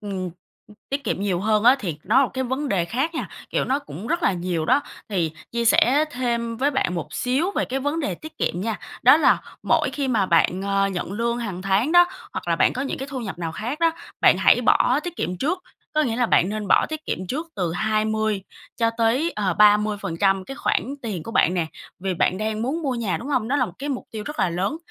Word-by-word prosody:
ừm, 190 -4 -4 0.6
tiết 275 0 -2
kiệm 195 - -1
nhiều 190 -3 0
hơn 215 +1 +2
á, 255 +3 +7
thì 170 - -4
nó 250 +8 +4
là 255 - +1
cái 260 - -1
vấn 265 +3 -2
đề 185 -4 +1
khác 265 - -2
nha, - - -3 0.2
kiểu, - - 0
nó 270 +2 +1
cũng 230 -7 -9
rất 340 +3 -1
là 195 - +3
nhiều 175 -2 -2
đó. 285 - +4 0.3
Thì 170 -6 -1 0.2
chia 235 0 -1
sẻ 270 +6 +4
thêm 235 -3 -2
với 280 +4 +1
bạn 265 -10 0
một 170 - -5
xíu 270 +9 0
về - - -1
cái 265 +2 -3
vấn 290 +4 -1
đề 290 - -2
tiết 315 0 -12
kiệm 175 - -1
nha, 220 +1 -2 0.2
đó - - +8
là - - +4 0.2
mỗi - - +2
khi 280 -2 -2
mà 210 -6 +2
bạn, 180 +3 +2
à, 195 0 +1
nhận 185 0 -4
lương 235 +2 -1
hằng 195 -6 -4
tháng 200 - +1
đó, 350 0 +8 0.3
hoặc - - -5
là - - +2
bạn - - +3
có 260 - -3
những 275 - -3
cái 270 +2 -5
thu 260 -2 -4
nhập 195 -6 -6
nào 165 -2 -3
khác 245 - -4
đó, 330 0 +4 0.3
bạn - - +6
hãy - - +5
bỏ 255 +4 +3
tiết 350 -1 -5
kiệm 180 +1 -2
trước. 360 - -1 0.3
Có 310 - +3
nghĩa 235 -5 -1
là 245 -1 +2
bạn 180 - +3
nên 210 -2 -4
bỏ - - +4
tiết 310 0 -6
kiệm 185 - -3
trước 310 - -3
từ 175 -3 -1
20 215 +1 0 0.3
cho 230 -1 +2
tới, 250 +9 +2
ờ, 190 -4 0
30% 205 -3 +3
cái 270 - -7
khoản 270 +4 -1
tiền 200 -8 -4
của 230 - -7
bạn 180 -4 +3
nè. 170 -3 0 0.3
Vì 190 0 -2
bạn 185 +2 +1
đang 215 +1 -2
muốn 305 +7 -2
mua 270 -3 -1
nhà, 230 -6 -1
đúng 265 - -7
hông? 250 -5 0
Đó 285 - +1
là 250 -4 +2
một 175 - -10
cái 285 - -4
mục 270 -3 -3
tiêu 215 -2 -5
rất 300 +1 -6
là 185 - +2
lớn, 190 - -1
225 Hz, 250 wpm, -23 LUFS, 195-270 Hz, 0.6 s, đó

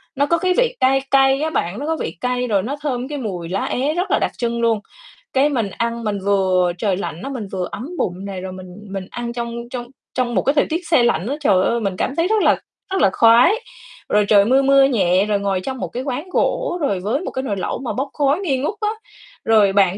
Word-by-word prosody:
nó 285 +1 +2
có 335 +3 +2
cái 365 +2 +1
vị - - +2
cay 270 +1 +3
cay 270 +1 +4
á 315 - 0
bạn. 195 - -2
Nó 290 - -4
có 320 0 0
vị 165 - -5
cay 250 0 -1
rồi 200 -4 +1
nó 275 +5 -3
thơm 260 -3 -2
cái 295 -1 -5
mùi 180 -9 -5
lá 195 +2 -1
é 280 +5 0
rất 360 +3 -2
là - - +4
đặc - - 0
trưng 235 -1 -1
luôn. 225 -2 +2 0.5
Cái 275 +2 +3
mình 230 -8 -1
ăn 235 0 -2
mình 205 -2 -2
vừa 185 -3 +2
trời 190 -1 0
lạnh 170 -3 -5
á, 275 - -4
mình 235 -7 -5
vừa 185 -2 -2
ấm 255 +9 -6
bụng 185 +2 -2
này, 190 -2 -5
rồi 190 0 -6
mình 185 -1 -10 0.2
mình 195 -1 -5
ăn 240 0 -4
trong 235 -1 -4
trong 245 -1 -5 0.3
trong 240 -2 -1
một - - +3
cái 275 - +2
thời 285 - +4
tiết 335 +1 -3
se 285 -8 +4
lạnh 230 -3 +1
á. 280 - -1
Trời 190 -8 +3
ơi, 235 - +1
mình 195 -3 -2
cảm 270 - -1
thấy 335 +2 +2
rất 435 -1 +2
là - - +4 0.4
rất 385 - +1
là 195 - +5
khoái. 235 - +6 0.6
Rồi 210 0 +3
trời 200 -2 +5
mưa, 265 +4 +4
mưa 275 0 +5
nhẹ, 195 -7 +2
rồi 205 -1 0
ngồi 195 -2 -1
trong 260 +5 -4
một - - -3
cái 250 +2 -5
quán 285 +6 -4
gỗ, 365 0 0
rồi 200 -10 0
với 220 - -1
một - - -5
cái 260 - -3
nồi 205 -6 -2
lẩu 185 - -3
mà 260 - -4
bốc 270 +2 -2
khói 290 +3 +1
nghi 290 -9 0
ngút 300 +10 -2
á. 420 - +1 0.6
Rồi 210 -3 +4
bạn 195 -1 +3
240 Hz, 260 wpm, -20 LUFS, 200-275 Hz, 0.6 s, khoái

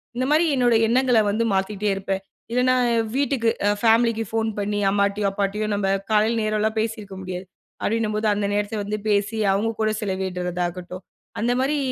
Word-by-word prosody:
இந்தமாரி 295 +7 +2
என்னுடைய 240 -3 +3
எண்ணங்கள 250 0 +3
வந்து 220 +3 0
மாத்திக்கிட்டே 195 +2 -1
இருப்பேன். 195 0 -3 0.3
இல்லன்னா, 250 +1 +3 0.4
வீட்டுக்கு 275 -5 +1 0.2
அ 205 - +4
ஃபேமிலிக்கு 230 0 +3
ஃபோன் 225 0 0
பண்ணி 205 +1 -1
அம்மாட்டயும், 200 0 +1
அப்பாட்டயும் 205 +2 -1
நம்ப 200 -1 0 0.2
காலையில 220 +2 +3
நேரலாம் 215 +1 0
பேசியிருக்க 215 -3 -4
முடியாது. 185 0 -5 0.4
அப்பிடின்னம்போது 215 -1 0
அந்த 205 0 -1
நேரத்த 205 +1 -1
வந்து 210 +1 -3
பேசி 205 +2 +1 0.2
அவுங்க 215 +3 0
கூட 215 0 +2
செலவிடுறதாகட்டும், 180 -2 -3 0.4
அந்தமாரி 255 +5 +1
215 Hz, 140 wpm, -23 LUFS, 200-230 Hz, 0.4 s, அ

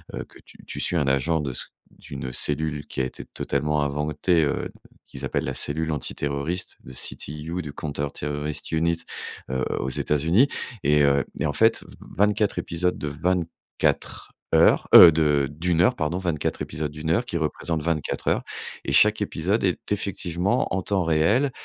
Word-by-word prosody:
heu, - - -4
que - - -22
que - - -19
tu - - -16
tu - - -6
suis 90 - 0
un 75 -4 +1
agent 70 +5 +2
de 70 -4 -3 0.4
d'une 65 -2 -7
cellule 75 +2 0
qui - - -5
a - - +1
été 65 - -7
totalement 75 0 -1
inventée, 75 +4 +1
heu, - - -2 0.4
qu'ils 65 - -10
appellent - - -1
la - - -2
cellule 80 +2 -2
antiterroriste 70 +4 -3
de 65 - -11
CTU, 75 +7 -3
de 75 - -7
Compter 70 -1 -3
Terrorist 75 0 -4
Unit, 85 +1 +1 0.5
heu, 65 0 -1 0.2
aux 65 - -2
États-Unis. 80 - +2 0.4
Et 75 +1 +4
heu 70 0 +3 0.2
et - - 0
en 70 - -2
fait 115 0 +3 0.3
24 105 0 +2
épisodes 90 +1 -1
de 75 - -4
24 85 +3 -2 0.2
heures, - - +5
heu, 85 - +12
de 75 -3 +2
de 80 +5 -5
1 85 0 +3
heure 125 +4 +4
pardon. 80 +3 -1
24 85 -6 -2
épisodes 75 -1 -4
de 75 - -10
1 80 - -1
heure, 95 +9 +2
qui 85 - -3
représente 80 0 -2
24 80 -2 -2
heures. - - +1 0.4
Et - - -2
chaque 105 +6 +5
épisode 100 +3 0
est 95 0 -1
effectivement 95 -2 0
en 95 - 0
temps 95 -1 0
réel. 95 - +2
80 Hz, 175 wpm, -24 LUFS, 75-90 Hz, 0.5 s, heu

